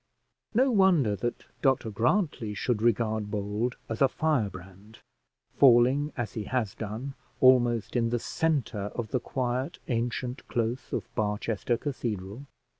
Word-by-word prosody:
No 260 +3 +4
wonder 180 - +4
that 120 +5 -3 0.2
Dr 130 -5 +2
Grantly 120 - 0
should 115 0 -1
regard 110 -2 +1
Bold 105 +4 -2
as 110 +2 -5
a 135 - +7
firebrand, 105 - -3 0.6
falling, 135 +3 +5
as 120 -3 -3
he 110 -2 -4
has 115 -5 -1
done, 115 +6 -5 0.3
almost 120 -3 +4
in 115 -1 +2
the 120 - +1
centre 120 -8 -1
of 115 -3 -3
the 125 - +1
quiet 125 +1 -2
ancient 120 +1 -2
close 120 +2 -2
of - - -3
Barchester 110 +1 -1
Cathedral. 115 -3 -4
120 Hz, 130 wpm, -28 LUFS, 110-130 Hz, 0.6 s, a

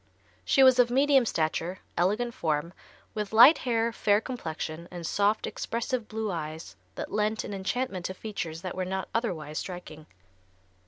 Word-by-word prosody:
She 270 - +4
was 260 -1 +6
of 245 -1 +5
medium 270 -1 +4
stature, 165 +2 -1 0.2
elegant 215 +7 +1
form, 160 -1 -1 0.4
with 210 -2 -3
light 240 +8 +8
hair, 230 -2 0
fair 205 -1 +3
complexion 170 -8 -5
and 175 -2 -7
soft, 205 +5 +1
expressive 235 0 -3
blue 220 -1 -3
eyes 155 - -6 0.2
that - - -6
lent 215 +1 0
an - - -6
enchantment 195 -1 -2
to 185 - -6
features 180 -6 -5
that 185 - -4
were 185 - -2
not 190 +1 -3
otherwise 160 -10 -2
striking. 165 -4 -8
200 Hz, 155 wpm, -28 LUFS, 170-230 Hz, 0.4 s, light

